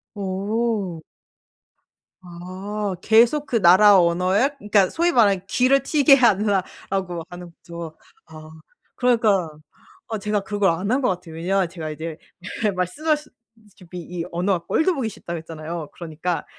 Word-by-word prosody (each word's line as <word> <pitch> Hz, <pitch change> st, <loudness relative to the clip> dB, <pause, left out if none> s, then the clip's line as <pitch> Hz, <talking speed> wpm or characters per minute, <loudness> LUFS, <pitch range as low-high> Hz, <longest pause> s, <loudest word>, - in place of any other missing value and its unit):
어. 200 Hz, -2 st, -2 dB, 1.2 s
아. 185 Hz, +3 st, -6 dB
계속 235 Hz, +8 st, +4 dB
그 235 Hz, -6 st, -1 dB
나라 190 Hz, +3 st, +7 dB
언어에 180 Hz, +9 st, +2 dB
그러니까 205 Hz, -5 st, +2 dB
소위 345 Hz, +1 st, +1 dB
말하는 205 Hz, -, +3 dB
"귀를 255 Hz, +6 st, +2 dB
트이게 280 Hz, -1 st, +5 dB
하라." 205 Hz, -6 st, +2 dB, 0.3 s
라고 180 Hz, -3 st, -3 dB
하는 175 Hz, -1 st, -10 dB
거죠. 170 Hz, -1 st, -10 dB, 0.3 s
아 155 Hz, 0 st, -12 dB, 0.5 s
그러니까 220 Hz, -8 st, +2 dB, 0.6 s
아 220 Hz, -, -3 dB
제가 210 Hz, 0 st, -1 dB
그걸 205 Hz, -1 st, 0 dB
안 185 Hz, +6 st, -3 dB
한 260 Hz, +3 st, +1 dB
것 250 Hz, -, +1 dB
같아요. 175 Hz, -3 st, -5 dB
왜냐하면 185 Hz, +3 st, 0 dB
제가 165 Hz, -3 st, -6 dB
이제 160 Hz, +1 st, -6 dB, 0.5 s
예 205 Hz, -, +3 dB
말씀 185 Hz, -, -4 dB
하셨다시피 225 Hz, -, -5 dB
이 170 Hz, 0 st, -6 dB
언어가 175 Hz, 0 st, -1 dB
꼴도 360 Hz, +3 st, +1 dB
보기 245 Hz, -6 st, -2 dB
싫다고 170 Hz, -4 st, -7 dB
했잖아요. 160 Hz, 0 st, -7 dB
그러니까 170 Hz, +1 st, -4 dB
195 Hz, 300 characters per minute, -22 LUFS, 175-225 Hz, 1.2 s, 나라